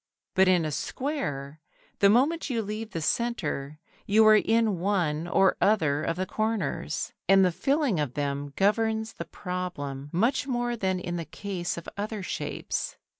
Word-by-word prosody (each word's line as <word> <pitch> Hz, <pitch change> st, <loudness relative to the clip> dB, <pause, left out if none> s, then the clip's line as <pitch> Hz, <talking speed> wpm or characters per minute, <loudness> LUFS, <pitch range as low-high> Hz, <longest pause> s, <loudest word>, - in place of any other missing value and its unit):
But 190 Hz, 0 st, +4 dB
in 180 Hz, -3 st, +4 dB
a 155 Hz, -, -2 dB
square, 155 Hz, -, -3 dB, 0.4 s
the 200 Hz, -, +6 dB
moment 285 Hz, +9 st, +3 dB
you 230 Hz, -3 st, 0 dB
leave 215 Hz, +2 st, -5 dB
the 165 Hz, -6 st, -4 dB
centre 155 Hz, -, -1 dB, 0.3 s
you 220 Hz, +2 st, +5 dB
are 215 Hz, 0 st, +8 dB
in 220 Hz, -3 st, +2 dB
one 170 Hz, -5 st, 0 dB
or 190 Hz, +2 st, +4 dB
other 155 Hz, -9 st, +3 dB
of 165 Hz, -, -1 dB
the 185 Hz, +2 st, -2 dB
corners, 220 Hz, +2 st, -2 dB, 0.2 s
and 195 Hz, -1 st, +7 dB
the 180 Hz, -, +2 dB
filling 275 Hz, -, +1 dB
of 145 Hz, -5 st, -2 dB
them 145 Hz, 0 st, -2 dB
governs 220 Hz, +2 st, +1 dB
the -, -, -6 dB
problem 145 Hz, -7 st, -5 dB
much 245 Hz, +10 st, +1 dB
more 240 Hz, -2 st, -1 dB
than 190 Hz, -4 st, -1 dB
in 175 Hz, -1 st, -4 dB
the 165 Hz, -, -4 dB
case 180 Hz, +2 st, -4 dB
of 170 Hz, -, -8 dB
other 210 Hz, 0 st, -3 dB
shapes. -, -, -3 dB
195 Hz, 165 wpm, -27 LUFS, 165-225 Hz, 0.4 s, are